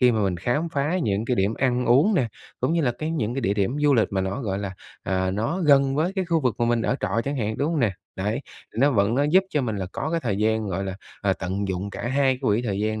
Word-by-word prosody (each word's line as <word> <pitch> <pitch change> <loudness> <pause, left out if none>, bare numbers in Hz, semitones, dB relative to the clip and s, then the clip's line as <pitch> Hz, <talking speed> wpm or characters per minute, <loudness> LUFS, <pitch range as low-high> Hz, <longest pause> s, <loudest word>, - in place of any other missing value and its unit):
khi 125 -2 +5
mà 110 -2 +1
mình 95 -3 0
khám 120 - -1
phá 150 +4 0
những 105 -1 0
cái 125 - 0
điểm 100 +3 +1
ăn 125 -1 0
uống 145 - +5
nè, 125 -10 +2 0.3
cũng 130 +6 +1
như 170 -2 +2
là 125 -3 +2
cái 155 +1 -2
những 120 -7 -1
cái 135 - -1
địa 100 -3 +1
điểm 105 +7 0
du 145 -2 +4
lịch 110 - +3
mà 95 - +1
nó, 95 +8 -2
gọi 100 -5 -2
là, 100 -2 -4 0.3
à, 95 0 0
nó 115 - -1
gần 140 -3 +4
với 165 +6 +1
cái 190 -2 -1
khu 165 -2 +1
vực 125 -6 +1
mà - - +4
mình 120 -1 +1
ở - - 0
trọ 105 +2 0
chẳng 140 +1 -2
hạn, 110 -2 -2
đúng 145 +4 +1
hông 160 -4 0
nè? 105 -5 +2 0.2
Đấy, 105 +7 -1 0.3
thì - - -15
nó 145 +1 +5
vẫn 105 -1 +2
nó 140 - +2
giúp 180 +6 +4
cho 150 - +1
mình 110 -4 -2
là 95 -2 -3
có 155 - -3
cái 165 -1 0
thời 105 -7 -1
gian, 110 0 +1
gọi 95 +2 -2
là, 95 0 -4 0.2
ờ, 100 -1 +2
tận 95 +2 -3
dụng 95 +2 -3
cả - - -7
hai 135 0 +2
cái - - -9
quỹ 115 -2 +1
thời 100 -4 -2
gian 110 0 -1
120 Hz, 300 wpm, -24 LUFS, 100-140 Hz, 0.3 s, khi